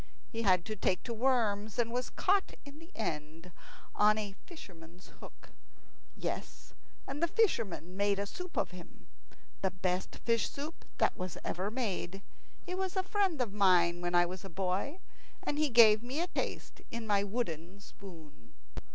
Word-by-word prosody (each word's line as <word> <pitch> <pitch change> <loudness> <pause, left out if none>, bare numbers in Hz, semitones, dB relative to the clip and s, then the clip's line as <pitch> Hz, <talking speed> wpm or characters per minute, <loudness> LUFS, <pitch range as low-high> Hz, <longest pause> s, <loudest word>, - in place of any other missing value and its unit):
He 230 - -2
had 185 -5 +4
to 215 - -3
take 185 -2 0
to 235 - -3
worms, 220 -4 +1
and 235 -1 +1
was 250 +1 -1
caught 390 +1 +1
in 285 +1 -11
the 330 +1 -13
end 165 -3 -4 0.4
on 210 +1 +5
a 205 -2 -3
fisherman's 180 - -12
hook. - - -13 0.7
Yes, - - -5 0.3
and 275 +3 -5
the 340 - +4
fisherman 225 - +1
made 200 0 +2
a 200 - -1
soup 360 - -7
of - - +1
him 180 -1 -12 0.6
the 190 - +2
best 185 0 -2
fish 230 -2 +2
soup 295 +4 -7
that - - +3 0.3
ever 180 +3 -2
was 220 - -10
made. 195 -5 -2 0.4
He 365 - -4
was 380 0 -2
a 375 - +1
friend 380 -5 +1
of 220 -5 -1
mine 175 -4 +4
when 175 0 0
I 175 0 +6
was 180 +1 -6
a 195 - -7
boy, 190 - -1 0.5
and 295 - -1
he 305 -1 +3
gave 220 -3 +8
me 255 +5 -3
a 345 - +2
taste 355 - -4
in 235 -1 -5
my 205 -2 +3
wooden 195 -4 -3
spoon. 160 - -13
205 Hz, 170 wpm, -33 LUFS, 180-260 Hz, 0.7 s, gave